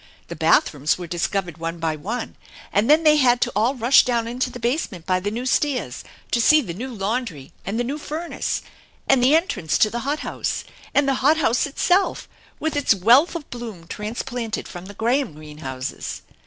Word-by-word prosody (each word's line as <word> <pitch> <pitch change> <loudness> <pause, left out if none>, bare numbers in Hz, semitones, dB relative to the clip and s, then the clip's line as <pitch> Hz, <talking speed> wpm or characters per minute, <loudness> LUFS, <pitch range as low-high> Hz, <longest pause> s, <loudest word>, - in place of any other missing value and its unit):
The - - -5
bathrooms 145 +1 +2
were 180 - -6
discovered 175 0 -2
one 165 +1 -4
by 160 -1 -1
one, 220 +10 -5 0.4
and 210 +5 +2
then 310 +2 +6
they 305 -1 +6
had 250 -3 +4
to - - +1
all 230 +6 +2
rush 245 +2 +5
down 235 -2 0
into 250 +2 -2
the 245 - -9
base 245 +7 0
ment 175 -4 -10
by 185 0 +1
the 200 +3 -2
new 235 +4 -4
stairs 260 - 0 0.3
to 235 - +2
see 310 +6 +6
the 215 - -4
new 250 +9 -6
laundry 205 - -3
and 210 +4 -1
the - - +1
new 280 +5 -3
furnace, 320 +3 -3 0.4
and 270 -2 +4
the 270 +5 +6
entrance 190 - 0
to 215 - +3
the 240 - -2
hot 285 +5 -2
house; - - -3 0.3
and 285 -1 +4
the 275 - +3
hot 300 +4 +4
house 260 -3 +2
itself, 355 +7 +1 0.3
with 315 -1 -2
its 285 -7 +3
wealth 240 - +5
of 325 -4 -5
bloom 225 -8 -7
transplanted 225 +4 -4
from 175 0 -9
the 205 - -10
Graham 240 - 0
greenhouses. 150 -4 -6
235 Hz, 195 wpm, -22 LUFS, 185-270 Hz, 0.4 s, then